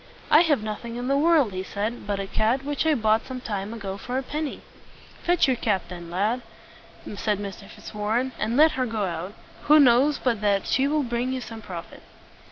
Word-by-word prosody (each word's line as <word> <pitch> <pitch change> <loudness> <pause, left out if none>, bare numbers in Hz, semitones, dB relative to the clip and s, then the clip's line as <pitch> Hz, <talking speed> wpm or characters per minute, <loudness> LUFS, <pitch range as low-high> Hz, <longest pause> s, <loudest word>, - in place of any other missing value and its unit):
"I 305 - +8
have 295 -10 +2
nothing 220 +2 -5
in 245 +1 -4
the 275 - +3
world," 295 - +3
he 185 - -3
said, 210 +4 -4
"but 200 -1 -1
a 195 - -2
cat 225 +7 0
which 290 +2 -1
I 310 - +4
bought 220 -2 +2
some 260 -1 -5
time 205 -4 -4
ago 200 -4 -5
for 250 +5 -4
a 265 - -1
penny." 300 +2 -4 0.6
"Fetch 350 0 +3
your 260 - +3
cat, 205 -6 0
then, 175 -2 -8
my 175 - -5
lad," 220 +6 +1 0.8
said 210 0 0
Mr. 200 0 -7
Fitzwarren, 220 +5 -2
"and 225 +4 0
let 310 +2 +7
her 260 -4 -1
go 220 -3 -1
out. 175 +2 -4 0.3
Who 305 +1 +7
knows 270 +2 +5
but 235 -5 -1
that 200 -2 +2
she 270 +1 +2
will 300 0 +1
bring 240 +1 -1
you 260 - -2
some 225 -2 -8
profit?" 175 -6 -9
230 Hz, 210 wpm, -25 LUFS, 205-265 Hz, 0.8 s, I